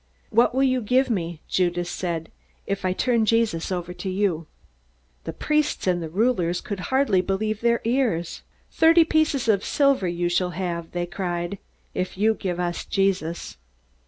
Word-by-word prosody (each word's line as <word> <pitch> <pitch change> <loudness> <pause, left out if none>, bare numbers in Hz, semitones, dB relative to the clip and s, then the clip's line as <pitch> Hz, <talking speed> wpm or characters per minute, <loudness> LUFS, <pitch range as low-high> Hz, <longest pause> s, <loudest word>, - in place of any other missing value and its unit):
"What 235 +2 +3
will 265 - +3
you 255 -1 +2
give 250 +4 +2
me," 170 -6 -3
Judas 175 -1 0
said, 170 -2 -4 0.3
"if 200 -1 -3
I 185 - +2
turn 235 +4 +1
Jesus 220 -7 +1
over 180 -1 -3
to 180 +2 -5
you?" 185 -4 0 0.8
The - - -3
priests 300 0 0
and 180 -2 +1
rulers 185 -4 +1
could 200 -2 -5
hardly 260 -8 +3
believe 210 +3 -2
their 235 0 +2
ears. 230 -9 0 0.3
"Thirty 330 +1 +6
pieces 315 -5 +1
of 205 -3 +3
silver 275 -9 +2
you 175 0 -1
shall 180 +1 +1
have," 170 -3 -3
they 175 0 -1
cried, 175 +1 -3 0.3
"if 185 0 -3
you 220 +3 +3
give 180 -5 -4
us 175 -1 -2
Jesus!" 185 -4 -1
195 Hz, 160 wpm, -24 LUFS, 175-235 Hz, 0.8 s, Thirty